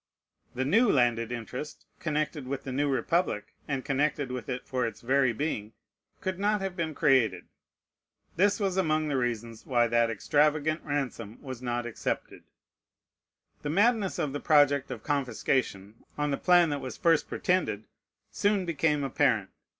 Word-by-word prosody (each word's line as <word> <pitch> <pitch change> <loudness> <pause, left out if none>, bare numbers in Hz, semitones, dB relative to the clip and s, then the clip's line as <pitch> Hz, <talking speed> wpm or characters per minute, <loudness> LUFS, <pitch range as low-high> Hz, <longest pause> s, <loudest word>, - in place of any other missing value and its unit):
The 130 +1 -1
new 225 - +4
landed 120 -3 +2
interest 125 +5 -6
connected 150 -3 -2
with 135 +1 -4
the 135 - -5
new 145 +3 0
republic, 150 - 0
and 135 -3 -3
connected 145 -1 0
with 125 0 -5
it 125 -1 -4
for 125 -2 -1
its 110 -2 -8
very 130 +1 +3
being, 110 -4 -3 0.5
could 190 -1 -3
not 210 +1 +2
have 195 -2 -4
been 160 -4 -3
created. 120 -12 +3 0.9
This 200 +5 +3
was 195 -2 0
among 155 -4 +1
the 140 - 0
reasons 115 -3 -2
why 120 -3 +2
that 115 0 +2
extravagant 150 - +1
ransom 135 -7 -3
was 130 -4 -8
not 120 -1 -2
accepted. 120 - -4 1.2
The 145 - -3
madness 205 +3 +2
of 140 -3 -1
the 145 - -2
project 145 -2 +4
of - - -6
confiscation, 120 -6 -1
on 150 0 0
the 140 - 0
plan 175 -3 +4
that 145 -1 -2
was 130 -1 -6
first 165 -2 +3
pretended, 110 - 0 0.5
soon 200 -2 +1
became 150 -3 +1
apparent. 135 - +1
140 Hz, 155 wpm, -28 LUFS, 120-155 Hz, 1.2 s, new